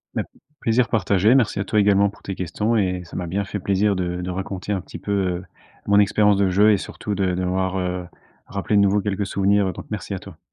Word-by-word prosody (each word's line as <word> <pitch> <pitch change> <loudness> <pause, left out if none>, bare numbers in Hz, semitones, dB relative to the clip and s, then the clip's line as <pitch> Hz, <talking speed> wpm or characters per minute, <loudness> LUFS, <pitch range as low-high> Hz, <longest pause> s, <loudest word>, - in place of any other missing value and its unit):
Beh, - - 0 0.4
plaisir 115 +1 +2
partagé, 100 +2 +3
merci 115 -6 +2
à - - +1
toi 105 +1 +1
également 100 0 +4
pour 100 - -17
tes 95 - -4
questions 105 +6 -1
et 90 -4 0
ça 85 - -12
m'a 90 - -3
bien 100 +4 -2
fait 105 - -4
plaisir 100 +2 +1
de 90 -1 -2
de 90 - -4
raconter 95 +2 -4
un 95 -2 0
petit - - -10
peu, 100 - -6
heu, 95 -3 0 0.4
mon 100 0 +4
expérience 105 0 +4
de 100 -1 +2
jeu 105 +4 +5
et 105 - +4
surtout 105 +2 -5
de 95 -2 0
d'avoir, 95 +1 -1
heu, 90 -1 -3 0.4
rappelé 100 +1 -2
de 100 - +6
nouveau 100 +1 +3
quelques 100 0 -2
souvenirs, 100 +1 +2
heu, 95 - -2
donc, - - -9
merci 105 -1 -4
à - - -5
toi. 90 -5 -13
100 Hz, 240 wpm, -22 LUFS, 95-105 Hz, 0.4 s, de